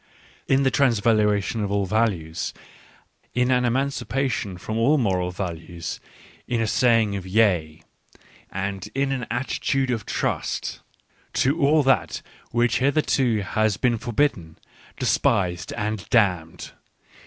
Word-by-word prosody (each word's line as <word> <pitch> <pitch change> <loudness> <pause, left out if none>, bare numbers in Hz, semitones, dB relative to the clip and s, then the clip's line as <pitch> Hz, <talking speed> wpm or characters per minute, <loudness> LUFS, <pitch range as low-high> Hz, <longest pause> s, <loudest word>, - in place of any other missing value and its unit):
In 135 +1 +3
the 135 - +3
Transvaluation 110 -4 +2
of 100 - -2
all 100 -1 +1
Values 95 -6 -1 0.4
\ - - -36
in 125 +1 +2
an 125 -1 +3
emancipation 125 -5 -1
from 110 +5 -5
all 140 +7 +4
moral 95 -8 0
values, 85 -2 -5 0.5
in 120 - 0
a 115 - +1
say 115 0 +3
ing 100 -2 -3
of 95 -2 -5
yea, 90 -6 +1 0.7
and 95 +1 -4
in 135 0 +1
an 125 -4 -3
attitude 130 +2 -1
of 115 -4 -3
trust, - - -2 0.5
to 145 +6 +1
all 150 +2 +4
that 135 -1 +1 0.3
which 120 -3 +1
hitherto 135 -5 +2
has 110 +1 0
been 120 -3 +1
forbidden, 110 - -1 0.4
despised, 90 -1 +1
and 105 -1 -3
damned. 90 -8 +1
110 Hz, 130 wpm, -24 LUFS, 95-125 Hz, 0.7 s, all